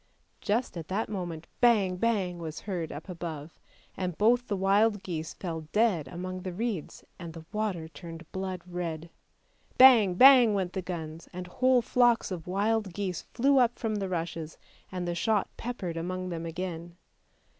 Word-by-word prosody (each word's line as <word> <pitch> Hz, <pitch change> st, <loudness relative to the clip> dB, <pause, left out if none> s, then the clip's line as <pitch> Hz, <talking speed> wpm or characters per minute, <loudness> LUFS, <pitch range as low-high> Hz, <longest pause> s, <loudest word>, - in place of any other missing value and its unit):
Just 215 Hz, -2 st, -1 dB
at 160 Hz, -2 st, -6 dB
that 205 Hz, +4 st, -2 dB
moment, 175 Hz, -5 st, -5 dB
bang! 210 Hz, -7 st, +4 dB
bang! 190 Hz, -5 st, 0 dB
was 160 Hz, -2 st, -6 dB
heard 175 Hz, -6 st, -4 dB
up 150 Hz, +5 st, -8 dB
above, 165 Hz, -4 st, -7 dB, 0.4 s
and 180 Hz, -3 st, -3 dB
both 240 Hz, +3 st, +3 dB
the 205 Hz, -, -1 dB
wild 200 Hz, +2 st, +3 dB
geese 160 Hz, -4 st, -5 dB
fell 160 Hz, -4 st, -5 dB
dead 210 Hz, -, +2 dB
among 185 Hz, +4 st, -5 dB
the 185 Hz, -1 st, -5 dB
reeds, 210 Hz, -4 st, -4 dB, 0.2 s
and 170 Hz, -2 st, -7 dB
the 165 Hz, -1 st, -10 dB
water 205 Hz, -7 st, -2 dB
turned 165 Hz, 0 st, -10 dB
blood 185 Hz, -2 st, -4 dB
red. 170 Hz, -2 st, -5 dB, 0.7 s
Bang! 230 Hz, -8 st, +8 dB
bang! 250 Hz, -2 st, +8 dB
went 185 Hz, -2 st, -1 dB
the 190 Hz, -, -2 dB
guns, 165 Hz, -3 st, -6 dB
and 180 Hz, +1 st, -6 dB
whole 255 Hz, +6 st, +2 dB
flocks 240 Hz, -3 st, +3 dB
of 175 Hz, -3 st, -5 dB
wild 205 Hz, 0 st, 0 dB
geese 185 Hz, -4 st, -2 dB
flew 275 Hz, +2 st, +4 dB
up 240 Hz, -1 st, +3 dB
from 225 Hz, -2 st, -2 dB
the 200 Hz, -2 st, -2 dB
rushes 165 Hz, -2 st, -4 dB, 0.3 s
and 180 Hz, -1 st, -3 dB
the 175 Hz, -, -1 dB
shot 210 Hz, +3 st, +1 dB
peppered 200 Hz, -9 st, -4 dB
among 185 Hz, +2 st, -3 dB
them 165 Hz, -1 st, -4 dB
again. 170 Hz, 0 st, -5 dB
185 Hz, 165 wpm, -29 LUFS, 170-215 Hz, 0.7 s, Bang